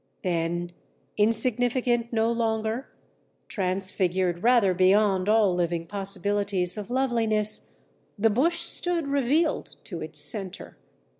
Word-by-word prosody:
"Then, 175 0 -2 0.4
insignificant 235 +2 +1
no 225 0 +1
longer, 225 +2 -2 0.6
transfigured 185 -2 -1
rather 230 -5 +4
beyond 190 +1 +3
all 215 -4 +4
living 170 -1 -1
possibilities 200 -1 0
of 210 -2 -7
loveliness, 230 -5 0 0.4
the 220 +2 +2
bush 335 +10 +1
stood 340 -1 +1
revealed 285 +3 0
to - - -7
its - - -4
centre. 195 -5 -2
210 Hz, 100 wpm, -26 LUFS, 185-240 Hz, 0.6 s, rather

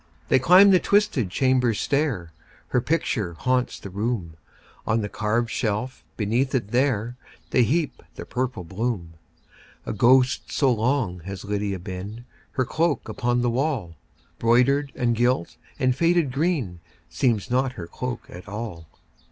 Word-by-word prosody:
They - - +5
climb 185 +8 +7
the 185 - +6
twisted 200 - +2
chamber 125 +1 +2
stair; 135 - -1 0.4
Her 125 - +2
picture 120 - -1
haunts 125 +6 0
the 100 - -9
room; 100 -5 -2 0.5
On 115 0 +2
the 105 - -3
carved 115 +4 -1
shelf 120 +3 -2
beneath 120 +6 0
it 110 -6 -1
there, 120 -2 +1 0.3
They 125 - +4
heap 150 +7 0
the - - -7
purple 125 -6 -3
bloom. 95 -2 -3 0.7
A - - -3
ghost 125 +5 +3
so 135 -3 +3
long 115 -5 0
has 100 0 -6
Lydia 100 -1 -2
been, 95 +6 -7 0.3
Her 130 - 0
cloak 155 0 0
upon 120 +2 0
the 120 - +2
wall, 125 - -1 0.4
Broidered, 135 +5 +3
and 120 -1 +1
gilt, 120 -6 +1 0.2
and 130 -1 +2
faded 170 -2 +2
green, 135 - -1 0.3
Seems 120 -2 0
not 130 +1 +1
her 90 - -7
cloak 125 +8 -5
at 90 +3 -11
all. 105 -6 -6
120 Hz, 145 wpm, -24 LUFS, 105-130 Hz, 0.7 s, climb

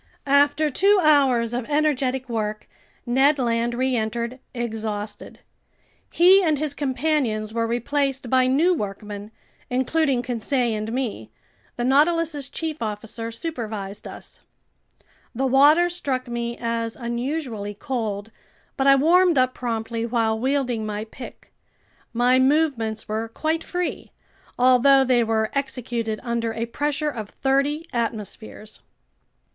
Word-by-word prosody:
After 285 +2 +3
two 400 +8 +4
hours 265 -6 +3
of 245 -1 -2
energetic 270 -3 0
work, 215 -2 -3 0.4
Ned 270 +4 +3
Land 235 -1 0
reentered, 240 -1 -1
exhausted. 220 -3 -5 0.7
He 370 +3 +6
and 315 -5 +2
his 300 0 -2
companions 260 -6 -1
were 230 0 0
replaced 270 +3 -1
by 255 +1 +3
new 310 +8 +3
workmen, 205 - -5 0.4
including 260 0 +1
Conseil 245 0 0
and 215 +1 -4
me. 230 - -3 0.5
The 240 - -3
Nautilus's 295 +2 +2
chief 315 -3 -4
officer 225 +1 -4
supervised 220 -7 -5
us. - - -10 1.0
The 265 +3 0
water 290 +6 +5
struck 275 -8 -3
me 235 0 -3
as 230 -1 -2
unusually 235 -3 -4
cold, 220 -3 -4 0.5
but 270 - +1
I 275 - +8
warmed 340 +3 +4
up 255 0 +3
promptly 230 -1 -3
while 225 -2 0
wielding 255 -3 0
my 210 0 -4
pick. 240 +3 -12 0.6
My 245 +2 +3
movements 260 -6 +1
were 220 +1 -2
quite 315 +7 -2
free, 355 0 -4 0.4
although 255 +2 +5
they 250 -2 +3
were 220 -1 0
executed 240 -5 -2
under 235 -2 -2
a 230 +1 -2
pressure 295 +5 -1
of 215 -6 -6
thirty 275 +4 0
atmospheres. 220 -2 -5
250 Hz, 120 wpm, -23 LUFS, 225-280 Hz, 1.0 s, I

